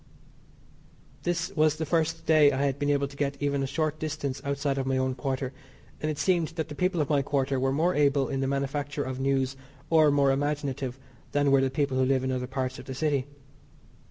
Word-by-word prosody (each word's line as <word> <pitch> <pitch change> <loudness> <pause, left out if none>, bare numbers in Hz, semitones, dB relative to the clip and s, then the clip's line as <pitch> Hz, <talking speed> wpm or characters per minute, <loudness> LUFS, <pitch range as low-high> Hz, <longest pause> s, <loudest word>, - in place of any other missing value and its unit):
This 175 -1 -1
was 155 -1 +3
the 160 - -3
first 165 0 0
day 155 -2 +6
I 135 +1 0
had 140 0 -1
been 145 - 0
able 140 -1 +2
to 140 - -13
get 140 -1 -2
even 140 -1 0
a 135 - -1
short 155 +2 -1
distance 145 -3 -3
outside 140 0 -1
of 135 - -2
my 135 0 +1
own 130 0 0
quarter, 130 +1 -3 0.5
and 155 - -1
it 155 - -2
seemed 175 -2 +2
that 160 -1 -3
the - - -6
people 180 +2 0
of 145 - -1
my 145 -2 +3
quarter 135 -1 0
were 135 +1 +1
more 165 +6 +2
able 140 -3 +3
in 135 - -2
the 135 - 0
manufacture 140 +1 -2
of 130 -1 -5
news 135 0 +1 0.4
or 155 -2 +6
more 140 -1 +3
imaginative 140 -2 -2 0.4
than 145 -1 +3
were 135 -1 +5
the 135 - +2
people 135 -1 0
who 130 - +4
live 130 0 +2
in 130 - -1
other 125 -1 -2
parts 130 0 -3
of - - -10
the 130 - -6
city. 140 -2 0
140 Hz, 220 wpm, -27 LUFS, 135-150 Hz, 0.5 s, day